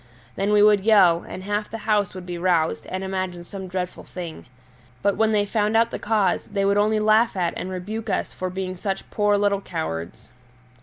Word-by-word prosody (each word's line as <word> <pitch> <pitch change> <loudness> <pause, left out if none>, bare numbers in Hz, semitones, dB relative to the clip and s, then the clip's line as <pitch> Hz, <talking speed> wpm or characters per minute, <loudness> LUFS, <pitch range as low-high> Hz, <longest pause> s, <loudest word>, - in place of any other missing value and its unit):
Then 200 +1 0
we 210 0 +5
would 210 -1 +6
yell, 190 -5 +5
and 185 - -7
half 205 +1 -2
the 225 - -5
house 205 -4 +1
would 185 -1 -7
be 175 -1 -5
roused 170 -3 +1
and 185 +1 -4
imagine 185 -2 -3
some 190 +1 -8
dreadful 180 0 -4
thing. 175 -3 -8 0.6
But 200 -1 +2
when 220 0 +2
they 205 -1 +2
found 210 +1 +1
out 230 0 +3
the - - -4
cause, 210 -4 +1
they 200 -1 -1
would 200 0 +3
only 215 +1 +2
laugh 215 0 +3
at 175 -2 0
and 185 - -4
rebuke 210 +5 -5
us - - -1
for 185 - -4
being 185 0 -4
such 195 +1 -4
poor 205 -1 +2
little 200 -1 +1
cowards. 110 - -5
195 Hz, 205 wpm, -23 LUFS, 180-210 Hz, 0.6 s, would